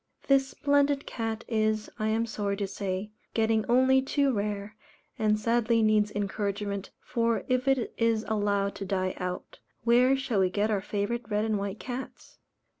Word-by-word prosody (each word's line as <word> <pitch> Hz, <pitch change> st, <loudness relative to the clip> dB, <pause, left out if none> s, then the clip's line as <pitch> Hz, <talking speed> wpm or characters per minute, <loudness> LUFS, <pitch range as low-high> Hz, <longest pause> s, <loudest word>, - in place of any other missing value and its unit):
This 275 Hz, -1 st, +4 dB
splendid 285 Hz, +1 st, +1 dB
cat 225 Hz, -1 st, -4 dB
is, 215 Hz, -1 st, 0 dB
I 215 Hz, -, 0 dB
am 225 Hz, +1 st, +1 dB
sorry 205 Hz, -3 st, -2 dB
to 200 Hz, -, -1 dB
say, 195 Hz, +1 st, -4 dB, 0.2 s
getting 220 Hz, -1 st, +2 dB
only 260 Hz, +2 st, +5 dB
too 275 Hz, 0 st, +1 dB
rare, 205 Hz, 0 st, -3 dB, 0.4 s
and 215 Hz, -1 st, +2 dB
sadly 230 Hz, 0 st, +2 dB
needs 215 Hz, -1 st, +3 dB
encouragement, 200 Hz, -1 st, -3 dB
for 230 Hz, -1 st, 0 dB
if 255 Hz, +1 st, 0 dB
it 270 Hz, -3 st, +1 dB
is 230 Hz, -1 st, +2 dB
allowed 205 Hz, -2 st, 0 dB
to -, -, -5 dB
die 185 Hz, -1 st, -1 dB
out, 180 Hz, 0 st, -5 dB, 0.2 s
where 250 Hz, +3 st, +5 dB
shall 260 Hz, -6 st, -1 dB
we 185 Hz, -1 st, +3 dB
get 205 Hz, +3 st, 0 dB
our 200 Hz, -2 st, +1 dB
favourite 210 Hz, +3 st, -3 dB
red 210 Hz, 0 st, +1 dB
and 215 Hz, -2 st, 0 dB
white 200 Hz, +1 st, -4 dB
cats? 255 Hz, +1 st, -7 dB
220 Hz, 165 wpm, -28 LUFS, 205-240 Hz, 0.4 s, only